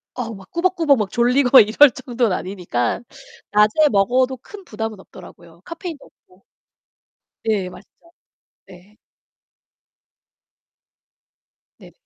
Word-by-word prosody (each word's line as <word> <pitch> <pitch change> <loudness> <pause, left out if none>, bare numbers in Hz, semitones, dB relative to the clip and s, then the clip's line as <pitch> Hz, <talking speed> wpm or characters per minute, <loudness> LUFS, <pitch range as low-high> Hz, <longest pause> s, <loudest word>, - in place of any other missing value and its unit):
어우 230 -2 -5
막 190 -1 -15
꾸벅꾸벅 340 -5 +1
막 210 -3 -3
졸리고 250 +2 +4
이럴 235 +6 +6
정도는 240 -6 -2
아니니깐 180 - -3 0.5
낮에 215 +9 +3
먹어도 255 +6 +1
큰 395 - -13
부담은 220 - -6
없더라고요 170 -3 -16
카페인도 335 -3 -8 0.2
없고. 185 +1 -26 1.0
네 210 -5 -1
맛있죠. 335 - -18 0.6
네. 185 +4 -18 2.8
네. - - -16
225 Hz, 230 characters per minute, -20 LUFS, 195-275 Hz, 2.8 s, 이럴